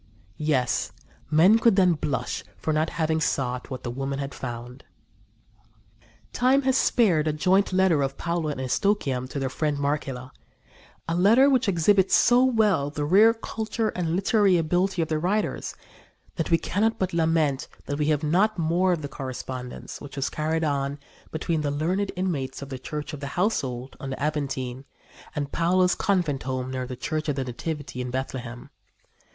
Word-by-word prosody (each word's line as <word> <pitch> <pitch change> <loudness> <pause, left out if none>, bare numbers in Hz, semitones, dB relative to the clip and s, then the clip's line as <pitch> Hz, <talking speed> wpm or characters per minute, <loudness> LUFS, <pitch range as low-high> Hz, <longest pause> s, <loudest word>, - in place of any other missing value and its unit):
Yes, 140 -5 0 0.4
men 180 +9 +6
could 230 -3 +4
then 185 -3 +5
blush 135 -5 -3
for 155 - -1
not 155 +1 +1
having 160 0 0
sought 125 -4 -1
what 130 -1 -6
the 120 - -3
women 135 +2 -3
had 140 0 -4
found." 125 +1 -7 1.5
Time 260 +3 +3
has 265 0 +2
spared 185 - +3
a 155 - +1
joint 185 +7 +2
letter 185 -5 +3
of 135 0 -2
Paula 170 -2 -1
and 130 - -8
Eustochium 130 -3 0
to - - -5
their 135 -1 -1
friend 145 +3 -1
Marcella 140 -3 -2 0.8
a 165 - -1
letter 225 +11 +5
which 255 -5 +2
exhibits 190 +2 +3
so 245 +1 +5
well 215 - +2
the 145 0 -3
rare 205 +8 +6
culture 225 0 -3
and 170 -2 -2
literary 195 -1 +3
ability 175 +2 +1
of - - -4
the 155 0 -1
writers 200 +6 -1 0.6
that 165 - -2
we 165 - +5
cannot 220 +7 0
but 185 -1 -2
lament 160 -4 +1 0.2
that 145 +1 -3
we 150 - +1
have 150 -1 +1
not 190 +8 +2
more 175 +3 +2
of 160 -3 -3
the - - -3
correspondence 130 -2 -7
which 145 -1 -9
was 140 -1 -2
carried 160 +1 -1
on 140 -2 -1 0.3
between 160 0 -1
the 145 - -1
learned 175 +8 -1
inmates 165 -8 -2
of 140 - -9
the 130 -1 -6
Church 150 +3 -5
of 150 - -6
the 140 +2 -7
Household 130 - -1
on 135 - -6
the 130 - -5
Aventine 135 -3 -2 0.5
and 145 -1 -3
Paula's 180 +2 +3
convent 175 -9 0
home 130 -1 -3
near 130 -1 -3
the 130 - -5
Church 155 +5 -3
of 145 - 0
the 135 - -1
Nativity 130 +1 -5
in 125 - -4
Bethlehem. 125 -2 -5
155 Hz, 175 wpm, -25 LUFS, 135-185 Hz, 1.5 s, men